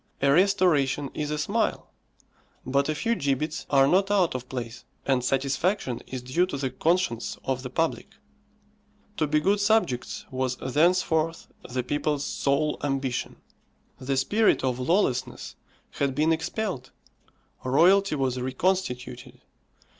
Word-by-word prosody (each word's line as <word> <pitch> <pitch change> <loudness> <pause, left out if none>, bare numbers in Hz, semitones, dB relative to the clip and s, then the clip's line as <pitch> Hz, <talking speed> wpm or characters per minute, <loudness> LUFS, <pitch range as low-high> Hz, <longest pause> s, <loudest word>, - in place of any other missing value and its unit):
A 140 0 +3
restoration 160 -7 +2
is 150 -1 -3
a 150 - -2
smile; 150 - -1 0.8
but 140 +3 +1
a 155 - 0
few 230 +10 0
gibbets 150 - -2
are 135 -1 +5
not 195 +5 +3
out 195 -4 +2
of 125 -1 -6
place, 120 -2 -6 0.2
and 130 -3 +1
satisfaction 135 - 0
is 130 -2 -6
due 165 +9 +1
to 165 - -4
the 135 -2 -2
conscience 165 -9 0
of 130 -1 -2
the 125 - -6
public. 165 - -2 1.0
To 155 - +1
be 150 +1 +2
good 200 +6 +2
subjects 200 - 0
was 130 -1 -1
thenceforth 165 +2 +1 0.2
the 125 0 -2
people's 145 +2 -1
sole 145 +2 0
ambition. 135 -3 -2 0.6
The 135 +1 -2
spirit 210 +11 +2
of 130 -1 0
lawlessness 130 -2 0 0.4
had 140 -2 -1
been 155 +2 +3
expelled. 160 - -3 0.7
Royalty 175 +7 +4
was 130 -3 -1
reconstituted. 130 - -2
145 Hz, 130 wpm, -26 LUFS, 130-175 Hz, 1.0 s, are